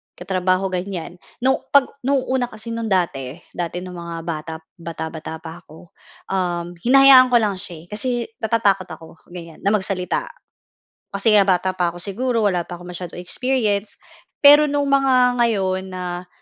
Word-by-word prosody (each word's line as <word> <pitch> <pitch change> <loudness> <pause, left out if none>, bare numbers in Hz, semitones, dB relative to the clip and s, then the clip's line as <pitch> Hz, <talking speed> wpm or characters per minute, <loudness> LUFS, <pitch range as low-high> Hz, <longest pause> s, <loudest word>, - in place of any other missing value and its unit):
katrabaho 185 0 -1
ganyan. 180 -1 -5 0.2
Nung 265 +1 +3 0.2
‘pag 280 -2 +5
no'ng 270 0 0
una 255 -2 +1
kasi 220 0 -8
no'ng 230 -1 -3
dati, 155 -9 -1 0.2
dati 175 +1 -4
no'ng 180 -1 -8
mga 170 0 -6
bata 160 -1 -5 0.3
bata-bata 160 -1 -7
pa 165 +1 -8
ako, 165 0 -17 0.4
uhm, 175 -2 -1
hinahayaan 265 +3 +7
ko 250 - +1
lang 210 -5 +2
siya, 175 -5 -7
eh, - - -17
kasi 210 +5 -1 0.3
natatakot 210 -5 +1
ako 160 0 -12
ganiyan, 170 -2 -10
na 200 +2 +1
magsalita 190 -2 -2 0.9
kasi 200 +3 0
nga 210 - +7
bata 185 -1 +2
pa 175 -1 +2
ako 170 - -6
siguro, 230 +3 -1
wala 180 -4 0
pa - - -6
akong 175 +1 -11
masyadong 175 -1 -7
experience. 215 0 -1 0.5
Pero 295 +1 +8
nung 285 0 0
mga 255 -3 +3
ngayon 190 -5 0
na 180 -1 -5
190 Hz, 160 wpm, -21 LUFS, 175-230 Hz, 0.9 s, Pero